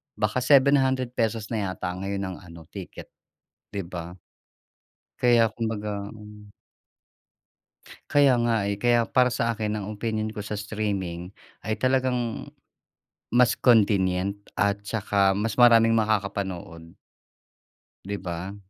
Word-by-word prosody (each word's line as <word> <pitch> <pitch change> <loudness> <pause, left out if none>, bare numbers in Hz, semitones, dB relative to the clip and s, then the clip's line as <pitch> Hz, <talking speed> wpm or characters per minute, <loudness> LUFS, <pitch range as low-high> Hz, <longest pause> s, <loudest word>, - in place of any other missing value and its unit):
baka 105 +3 0
₱700 130 -5 +2
na 105 -4 -1
yata 95 -1 -4
ngayon 100 +1 -3
ang 95 -1 -5
ano 85 -3 -13
ticket, 95 -3 -9 0.6
'di 100 -3 -5
ba? 85 0 -8 1.1
Kaya 115 -3 +4
kumbaga 105 -3 -4
hmm. 105 -1 -13 1.6
Kaya 145 -2 +5
nga, 120 -1 +2
eh, 100 0 -2
kaya 120 -1 +3
para 125 +2 +3
sa 115 -2 0
akin 105 -1 -2
ang 100 - -5
opinyon 110 0 -3
ko 105 - -5
sa 105 +1 -5
streaming 100 -4 -3 0.3
ay 110 +1 -3
talagang 130 -3 0 0.8
mas 125 0 +4
convenient 100 -5 +3 0.2
at 100 0 +2
tsaka 100 -2 +1
mas 105 +1 -2
maraming 115 -2 +7
makakapanood. 100 -6 -2 1.1
'Di 100 +1 -4
ba? 90 +2 -5
105 Hz, 115 wpm, -25 LUFS, 100-115 Hz, 1.6 s, maraming